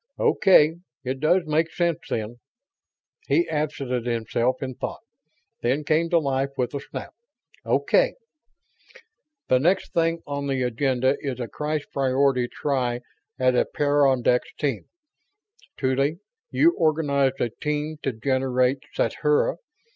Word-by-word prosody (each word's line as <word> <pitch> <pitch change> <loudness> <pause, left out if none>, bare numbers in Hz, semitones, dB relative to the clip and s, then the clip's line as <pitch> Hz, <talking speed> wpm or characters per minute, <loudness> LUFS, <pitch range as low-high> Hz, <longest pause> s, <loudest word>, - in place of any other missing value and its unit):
"Okay, 160 -4 +4 0.3
it 130 0 -3
does 170 +5 +3
make 155 +2 +1
sense, 170 -3 0
then." 115 +2 -3 0.9
He 345 - +2
absented 135 -5 -2
himself 120 +2 0
in 130 -1 -4
thought, - - -6 0.6
then 130 +5 0
came 160 +3 +1
to 170 - +4
life 135 -3 0
with 125 0 -1
a 140 - -2
snap. - - -8 0.5
"Okay! - - +2 1.3
The 130 - +4
next 180 +7 +1
thing 165 0 +1
on 140 -1 -3
the 135 -2 0
agenda 130 +2 +1
is 135 -3 -4
a 120 - -3
crash 150 +6 -3
priority 130 -1 +2
try 125 -3 -1 0.4
at 130 -1 +3
a 125 - +3
peyondix 135 -4 +2
team. 135 -7 -2 0.9
Tuly, 135 +4 +1 0.3
you 335 - +4
organized 145 -4 +1
a 120 - 0
team 150 +3 -3
to 135 - -1
generate 130 +2 +1 0.2
sathura. 150 +2 +1
140 Hz, 125 wpm, -24 LUFS, 130-155 Hz, 1.3 s, Okay